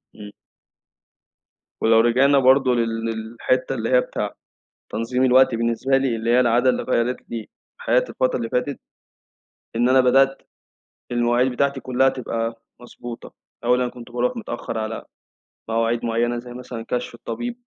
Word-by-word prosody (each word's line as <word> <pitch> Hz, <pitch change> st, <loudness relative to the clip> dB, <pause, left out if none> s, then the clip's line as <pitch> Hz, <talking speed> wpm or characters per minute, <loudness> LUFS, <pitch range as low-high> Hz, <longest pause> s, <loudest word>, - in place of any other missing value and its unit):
إمم. 105 Hz, -1 st, -10 dB, 1.5 s
ولو 115 Hz, 0 st, +5 dB
رجعنا 130 Hz, +5 st, +4 dB
برضه 130 Hz, -1 st, +4 dB
لل 115 Hz, -1 st, -1 dB
للحتّة 115 Hz, +4 st, -2 dB
اللي 115 Hz, -2 st, -3 dB
هي 125 Hz, -1 st, +5 dB
بتاع -, -, -4 dB, 0.6 s
تنظيم 125 Hz, +3 st, 0 dB
الوقت 130 Hz, 0 st, +5 dB
بالنسبة 115 Hz, +3 st, +1 dB
لي 135 Hz, -3 st, 0 dB
اللي 115 Hz, +1 st, -2 dB
هي 125 Hz, +1 st, +5 dB
العادة 125 Hz, +1 st, +3 dB
اللي -, -, -2 dB
غيّرِت 125 Hz, 0 st, -1 dB
لي 115 Hz, -2 st, -5 dB, 0.3 s
حياتي -, -, +1 dB
الفترة 130 Hz, -, 0 dB
اللي 115 Hz, -2 st, -3 dB
فاتت، 125 Hz, +4 st, -2 dB, 1.0 s
إن 120 Hz, +2 st, +3 dB
أنا 130 Hz, +1 st, +5 dB
بدأت 135 Hz, +2 st, +3 dB, 0.7 s
المواعيد 120 Hz, +2 st, +2 dB
بتاعتي 140 Hz, +2 st, 0 dB
كلها 130 Hz, +1 st, +2 dB
تبقى 115 Hz, -2 st, -4 dB, 0.2 s
مضبوطة 120 Hz, -1 st, -10 dB, 0.3 s
أولًا 125 Hz, +1 st, +2 dB
كنت 120 Hz, -1 st, -12 dB
باروح 125 Hz, -, -1 dB
متأخر 120 Hz, -, -5 dB
على 110 Hz, 0 st, -4 dB, 0.7 s
مواعيد 115 Hz, +1 st, 0 dB
معينة، 120 Hz, +1 st, 0 dB
زيّ 120 Hz, 0 st, -10 dB
مثلًا 125 Hz, -2 st, -8 dB
كشف 125 Hz, -1 st, -3 dB
الطبيب 235 Hz, -, -5 dB
120 Hz, 140 wpm, -22 LUFS, 115-130 Hz, 1.5 s, ولو